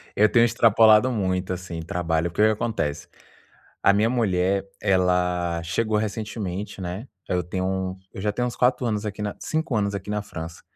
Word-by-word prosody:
Eu 105 +1 +5
tenho 120 +1 +5
extrapolado 115 0 +5
muito, 95 -4 -1
assim, 85 -2 -6
trabalho. 80 0 -1
O - - -14
que 105 - 0
que 110 - +7
acontece? 110 -9 -2 0.8
A 100 - +6
minha 105 +3 +3
mulher, 95 -5 +1 0.2
ela 90 -3 +1
chegou 105 +6 0
recentemente, 105 -2 -4
né? 95 +7 -5 0.2
Aí, 90 - +1
eu 90 - 0
tenho 95 +3 -3
um 95 0 -2
eu - - -7
já 105 +1 0
tenho 125 +4 -1
uns 120 - -7
4 125 0 +2
anos 105 -2 -1
aqui 105 0 -5
na 105 -1 -3
5 155 -6 -2
anos 100 -1 0
aqui 100 +1 -5
na 105 0 -1
França. 80 -4 -8
100 Hz, 190 wpm, -24 LUFS, 90-110 Hz, 0.8 s, que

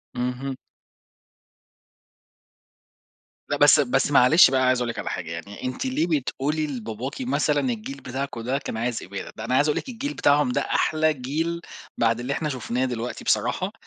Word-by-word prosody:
اهم. 125 +2 -3 2.9
لأ، 145 - 0
بس 145 +1 +7
بس 135 +1 +2
معلش 135 +4 +7
بقى 130 - +2
أنا 130 - +3
عايز 130 -1 +3
أقول 120 -1 -1
لِك - - -4
على - - -3
حاجة 85 -2 -5
يعني، 100 +5 -8
أنتِ 130 - -3
ليه 255 -10 0
بتقولي 150 +4 -2
لباباكِ 125 - -5
مثلًا: 255 - +1
"الجيل 240 +5 -5
بتاعكم 130 -2 -4
ده 130 +4 -1
كان 110 - -5
عايز 120 0 -2
إبادة"؟ 100 +1 -7
ده 110 - -5
أنا 125 +2 0
عايز 145 +3 +4
أقول 150 - +1
لِك 270 - -4
الجيل 275 +5 -4
بتاعهم 145 -2 +3
ده - - +1
أحلى 155 0 +1
جيل 160 +6 -3 0.4
بعد 115 0 +2
اللي 130 +3 -2
إحنا 150 +1 -2
شُفناه 125 0 -2
دلوقتي 120 -1 -4
بصراحة، - - +1
130 Hz, 175 wpm, -24 LUFS, 120-150 Hz, 2.9 s, بس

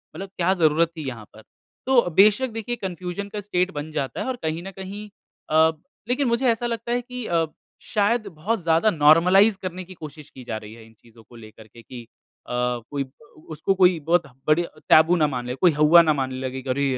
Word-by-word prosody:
मतलब 195 0 -7
क्या 180 +2 +2
जरूरत 160 +2 +3
थी 155 -3 -5
यहाँ 115 -4 -7
पर? 110 - -14 0.4
तो 260 -2 +5
बेशक 215 +6 +5
देखिए 225 +2 -4
कन्फ़्यूज़न 185 -2 -5
का 210 - -3
स्टेट 185 -2 -1
बन 150 0 -6
जाता 140 -4 -3
है - - -4
और 260 - -2
कहीं 160 +2 -3
न 195 - -7
कहीं 200 +2 -7 0.4
अ, 160 +1 +4 0.4
लेकिन 255 +2 +1
मुझे 235 +2 0
ऐसा 230 +1 -2
लगता 230 0 -4
है 245 +1 0
कि 250 -1 -8
अ, 165 -4 +1 0.4
शायद 215 0 0
बहुत 200 +6 -3
ज़्यादा 165 +6 +3
नॉर्मलाइज़ 180 +6 +5
करने 185 0 -5
की 185 +1 -12
कोशिश 155 -3 -11
की 130 - -13
जा 115 -2 -4
रही 110 0 -11
है 115 -1 -14
इन 115 - -19
चीजों 115 -1 -19
को 120 - -16
लेकर 110 -1 -14
के 115 +2 -16
कि 120 +2 -10
अ, - - -23 0.4
कोई 125 +2 -2
ब 130 - -17 0.4
उसको 155 +5 -1
कोई 180 -3 +4
बहुत 170 +1 +3 0.2
बड़ी 155 +3 +3 0.3
टैबू 160 +3 +6
ना 155 -4 +2
मान 125 -4 -4
ले, 125 - -3
कोई 175 +5 +4
हौवा 150 +3 +6
ना 160 -2 +2
मानने 130 -2 -3
लगे 130 0 -5
कि 130 - -8
अरे! 135 +2 0
165 Hz, 220 wpm, -23 LUFS, 135-200 Hz, 0.4 s, टैबू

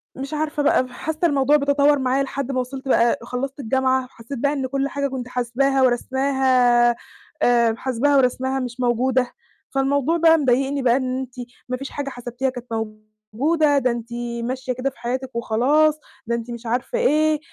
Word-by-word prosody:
مش 275 +3 -6
عارفة 300 -1 -1
بقى 285 -3 +3
وحاسّة 305 +5 -6
الموضوع 285 0 +3
بيتطوّر 285 0 +3
معايا 260 +1 +1
لحد 275 0 -4
ما 255 - -1
وصلت 265 +2 -5
بقى 235 -2 +3
خلّصت 265 +4 -4
الجامعة 260 +1 +1
وحسّيت 250 +1 -9
بقى 285 +2 +1
إن 265 -2 -2
كل 275 +1 -1
حاجة 280 0 -1
كنت 255 -2 -5
حاسباها 250 +2 0
وراسماها 255 -1 +3 0.5
آآ 235 -2 +4
وحاسباها 260 +4 +1
وراسماها 260 +1 +1
مش 250 0 -5
موجودة، 250 +1 +1 0.4
فالموضوع 280 +4 +1
بقى 325 0 +5
مضايقني 275 0 +1
بقى 245 -1 +3
إن 255 -1 -2
أنتِ 260 -1 -7 0.4
ما 255 - -1
فيش 275 +1 -7
حاجة 285 -1 -4
حسبتيها 245 +1 -3
كانت 245 -1 -8 0.7
موجودة، 300 +4 +2
ده 255 -3 +2
أنتِ 235 0 -6 0.3
ماشية 255 +1 -3
كده 255 +2 -2
في 270 - -20
حياتِك 255 +1 -4
وخلاص، 290 +7 +2 0.3
ده 235 - 0
أنتِ 235 +1 -5
مش 235 0 -8
عارفة 245 - -1
إيه 310 -8 +2
265 Hz, 170 wpm, -22 LUFS, 245-280 Hz, 0.7 s, بقى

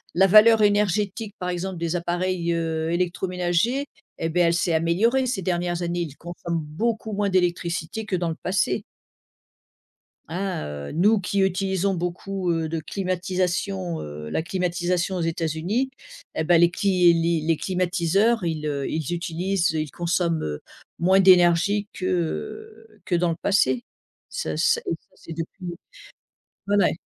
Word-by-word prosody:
la 190 +2 +5
valeur 215 +2 +7
énergétique 205 +1 +1
par 180 - -3
exemple 180 +1 -3
des 170 +1 -1
appareils, 175 0 -1
heu, 160 -1 -1
électroménagers, 180 +7 0 0.3
eh 165 - -1
ben, 175 +1 +3
elle 170 - +2
s'est 170 0 +1
améliorée 215 +11 +2
ces 225 -6 -1
dernières 175 0 -1
années, 175 0 -1
ils 150 -4 -5
consomment 170 -1 -4
beaucoup 215 +8 -2
moins 200 0 0
d'électricité 180 +3 -1
que 195 - -1
dans 170 -1 -1
le 160 - -3
passé. 190 +2 0 1.5
Hein, 185 - -3
heu, 70 -1 -6
nous 205 +6 +3
qui 195 +1 -1
utilisons 190 0 +1
beaucoup, 180 +1 -2
heu, 165 -1 -1
de 165 0 -2
climatisation, 185 0 -2
heu, 75 +1 -7
la 160 - -1
climatisation 180 0 -1
aux 175 - -1
États-Unis, 165 - -1 0.5
et - - 0
ben, 170 +1 +4
les 170 - +6
cli 180 -3 +4
les 165 -1 +1
les 165 -2 +3
climatiseurs, 185 +4 +1
ils, 155 -2 -2
heu, 140 -2 -2
ils 160 0 -3
utilisent, 175 +1 0
heu, 155 - -1
ils 155 - -4
consomment, 170 -1 0
heu, 75 -1 -4 0.4
moins 190 +3 +4
d'énergie 185 +2 +5
que 430 - -3 0.2
que 175 - 0
dans 175 0 +2
le 165 - -1
passé. 130 - +2 0.4
Ça 80 - -3
ce - - +3
et - - -26 0.2
ça - - -39
c'est 165 - -10
depuis 170 +2 -6 0.9
ouais, 205 - +3
ouais. 190 - +4
175 Hz, 155 wpm, -24 LUFS, 165-195 Hz, 1.5 s, valeur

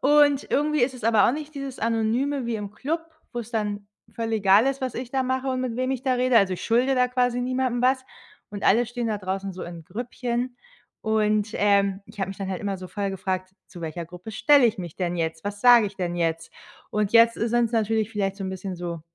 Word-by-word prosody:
und 290 0 +4
irgendwie 300 -1 +2
ist 255 +2 +1
es 250 - -11
aber 220 -3 +5
auch - - +3
nicht 305 +1 -6
dieses 275 -2 -6
Anonyme 230 +4 0
wie 235 - -1
im 205 -1 -6
Club, 305 +9 -2 0.3
wo's 240 -2 -5
dann 205 -3 -2 0.3
voll 225 -1 -3
egal 205 +1 +5
ist, 275 0 -1
was 255 -3 -3
ich 245 0 -5
da 265 0 +1
mache 260 +1 -1
und 255 -1 -1
mit 250 -3 -3
wem 255 +1 0
ich 260 -1 -2
da 260 -2 +1
rede. 250 -1 +2
Also, 190 -3 +2
ich - - -7
schulde 245 +4 +2
da 250 -1 +3
quasi 245 -1 +1
niemandem 255 -1 -1
was 260 +1 +2 0.5
und 205 0 -7
alle 235 +3 +4
stehen 240 -1 -3
da 210 -1 -1
draußen 190 0 -3
so 180 - -8
in 170 -2 -9
Grüppchen. 245 +3 -3 0.4
Und, 215 -1 +1
ähm, 200 -1 +2
ich 215 -1 -16
habe 190 - -1
mich 195 - -6
dann 195 -1 -4
halt 185 - -3
immer 200 -2 -2
so 185 - -8
voll 200 +2 -2
gefragt: 185 0 -3
„Zu 175 - -12
welcher 165 +1 -5
Gruppe 180 +5 -10
stelle 280 +4 +5
ich 220 - -1
mich 175 -4 -6
denn 175 -1 -2
jetzt? 160 -1 -3
Was 205 0 -4
sage 240 -3 +7
ich 195 - -8
denn 175 -2 -2
jetzt?“ 165 -1 -1 0.4
Und 210 0 0
jetzt 230 0 +6
ist 230 +1 -1
sind's 240 0 +2
natürlich 220 -1 +1
vielleicht 195 -3 -2
so 195 - -5
'n 190 - -3
bisschen 190 0 -5
so 170 -1 -5
220 Hz, 240 wpm, -25 LUFS, 195-250 Hz, 0.5 s, sage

